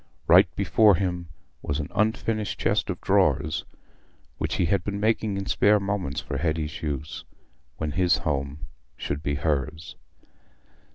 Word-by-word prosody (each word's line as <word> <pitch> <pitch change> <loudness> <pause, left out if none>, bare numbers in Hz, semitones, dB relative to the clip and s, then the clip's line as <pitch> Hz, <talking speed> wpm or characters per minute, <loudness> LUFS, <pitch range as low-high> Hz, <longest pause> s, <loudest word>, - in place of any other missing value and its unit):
Right - - +7
before 105 -3 +4
him 90 -1 -2 0.3
was 70 +1 -2
an 75 - -4
unfinished 110 0 0
chest - - +1
of - - -3
drawers, 75 +2 +2 0.7
which - - -1
he - - +1
had 90 +2 +1
been 100 +1 -3
making 110 -1 +1
in 100 - -3
spare 105 +2 +3
moments 100 -8 -2
for 70 - -4
Hetty's 80 -1 -2
use, 75 0 -4 0.5
when 80 -1 -2
his 90 0 +3
home 70 +1 -3 0.3
should 70 - -3
be 70 -1 -1
hers. 75 0 -2
80 Hz, 145 wpm, -25 LUFS, 75-100 Hz, 0.7 s, Right